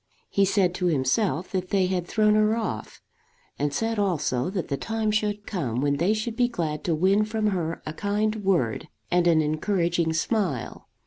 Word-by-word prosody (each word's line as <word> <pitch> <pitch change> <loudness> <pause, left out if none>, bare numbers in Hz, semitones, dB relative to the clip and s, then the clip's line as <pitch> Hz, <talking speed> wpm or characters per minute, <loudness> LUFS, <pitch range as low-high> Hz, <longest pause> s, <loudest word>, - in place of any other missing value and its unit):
He 200 - +3
said 190 -2 +2
to 180 0 -1
himself 165 - 0
that 185 -1 -2
they 195 -2 +2
had 180 -1 -1
thrown 215 -1 +3
her 215 +1 +3
off; 230 -1 -5 0.6
and 145 0 0
said 225 +7 -1
also 150 -9 0
that 185 -3 -3
the 140 - -1
time 220 +6 -1
should 210 -1 -1
come 130 - -2
when 140 +1 +1
they 185 +8 +2
should 220 +1 -3
be 245 0 +3
glad 155 -10 -3
to 170 - +1
win 190 +6 +3
from 215 0 0
her 165 -3 -3
a 155 - -4
kind 210 +4 -1
word 170 - 0 0.2
and 175 0 +3
an 160 -2 +4
encouraging 170 +1 0
smile. 170 - -2
185 Hz, 185 wpm, -25 LUFS, 160-210 Hz, 0.6 s, an